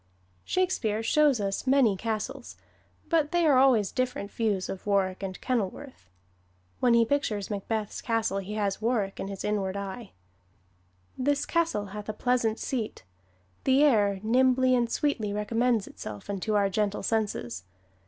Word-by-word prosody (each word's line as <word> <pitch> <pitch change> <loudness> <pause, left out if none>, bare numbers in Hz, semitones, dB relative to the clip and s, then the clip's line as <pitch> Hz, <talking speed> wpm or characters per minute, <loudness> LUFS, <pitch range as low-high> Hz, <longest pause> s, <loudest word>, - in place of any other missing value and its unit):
Shakespeare 230 - 0
shows 290 0 +3
us 195 +5 -2
many 260 -6 +4
castles, 220 +1 -4 0.5
but 315 -3 +1
they 345 -1 +2
are 280 -4 +5
always 240 -7 +4
different 250 -5 -2
views 210 -5 -1
of 195 - -7
Warwick 195 -2 +1
or 190 -1 -3
Kenilworth. 250 - -4 0.7
When 240 -2 +4
he 230 0 +5
pictures 220 -7 -1
Macbeth's 210 +1 -3
castle 225 -4 0
he 200 +2 -6
has 205 -1 -1
Warwick 215 -4 -1
in - - -3
his 195 -1 -6
inward 200 -2 -1
eye: 200 +3 -6 1.1
"This 285 +2 +1
castle 335 -12 0
hath 205 +2 -8
a - - -1
pleasant 235 -1 +1
seat: 230 - -4 0.6
the 270 +2 +4
air 205 -8 +3
Nimbly 255 +2 +3
and 240 -2 +2
sweetly 230 -9 -1
recommends 225 +1 +1
itself 105 - -8
Unto 200 +2 -2
our 200 -1 +3
gentle 205 +1 -1
senses. 200 - -2
220 Hz, 145 wpm, -28 LUFS, 200-255 Hz, 1.1 s, are